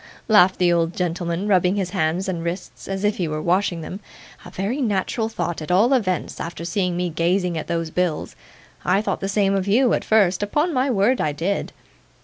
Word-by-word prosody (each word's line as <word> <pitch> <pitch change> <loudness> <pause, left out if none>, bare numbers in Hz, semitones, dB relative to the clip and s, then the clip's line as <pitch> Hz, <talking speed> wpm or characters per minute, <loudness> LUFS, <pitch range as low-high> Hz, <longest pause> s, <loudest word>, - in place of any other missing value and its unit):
laughed 200 -4 +5
the 175 -1 +3
old 170 0 0
gentleman, 175 +1 -2
rubbing 185 -1 +3
his 190 -3 -2
hands 180 +1 0
and 175 -3 -3
wrists 170 +2 -6
as 195 0 -3
if 210 0 +1
he 175 - -1
were 155 0 -3
washing 175 +1 0
them. 180 +5 -7 0.4
'A - - -10
very 215 +9 -3
natural 220 0 -1
thought, 170 -7 -3
at 155 - -7
all 210 +9 +4
events, 190 -9 -1
after 170 0 -5
seeing 180 0 -1
me 180 0 0
gazing 175 +2 0
at 160 - -4
those 165 -2 -2
bills. 180 -3 -1 0.5
I 195 +4 +2
thought 195 -3 -2
the 195 - -3
same 200 -1 +2
of 195 0 -1
you, 240 +4 +3
at - - 0
first; 200 -4 +3
upon 295 - 0
my 260 +1 +1
word 235 +2 +2
I 150 - 0
did. 180 +7 -2
185 Hz, 205 wpm, -22 LUFS, 170-205 Hz, 0.5 s, laughed